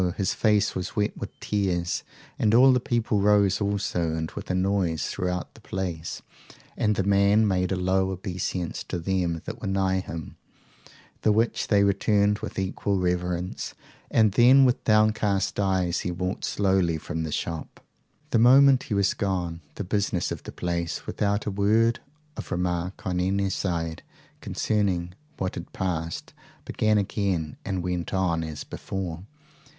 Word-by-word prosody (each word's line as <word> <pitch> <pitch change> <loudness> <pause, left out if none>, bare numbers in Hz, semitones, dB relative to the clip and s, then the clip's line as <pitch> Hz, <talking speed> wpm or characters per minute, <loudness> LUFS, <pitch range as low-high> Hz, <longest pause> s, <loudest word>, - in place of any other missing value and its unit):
his 95 - 0
face 105 -2 +2
was 90 - -4
wet 105 -1 0
with - - -6
tears; 90 -4 -1 0.4
and 110 0 +3
all 130 +2 +7
the 125 - +3
people 115 -3 0
rose 100 -1 +3
also, 95 -5 0
and 80 0 -3
with - - -8
a 90 - 0
noise 90 -4 0
throughout 90 -1 -3
the - - -17
place; 90 -4 -4 0.5
and 105 -1 +1
the 100 - 0
man 100 +2 +4
made 90 -1 +1
a - - +2
low 95 +1 +1
obeisance 90 -2 -3
to - - -4
them 85 -2 -1
that - - -7
were - - -3
nigh 95 -1 +1
him, 85 -4 -7 0.8
the 110 - +3
which 110 +2 +1
they 100 -2 +4
returned 100 +1 +2
with - - -7
equal 95 +1 -1
reverence, 90 -1 -2 0.3
and 110 -2 +4
then 125 +6 +6
with 125 0 +1
downcast 110 -3 +2
eyes 95 -3 +1
he - - -3
walked 90 +3 -3
slowly 95 -5 +1
from 80 +1 -4
the 80 -1 -3
shop. 80 +1 -4 0.5
The 115 - +3
moment 135 +2 +7
he 105 - 0
was 100 0 +2
gone, 90 -4 -2
the - - -4
business 100 -2 -1
of - - -4
the - - -8
place, 85 -1 -3
without 100 0 -1
a 105 - -1
word 110 +4 +2 0.4
of - - -7
remark 90 +1 -2
on 90 -1 -1
any 95 +1 +1
side 85 -4 -2 0.4
concerning 95 -5 -1 0.2
what 95 - -2
had 85 - -8
passed, 85 -4 -3 0.3
began 110 0 +1
again 95 -6 -1
and 95 -3 -2
went 90 0 -2
on 85 -3 +1
as 80 -2 -6
before. 90 -2 -5
95 Hz, 160 wpm, -26 LUFS, 90-105 Hz, 0.8 s, all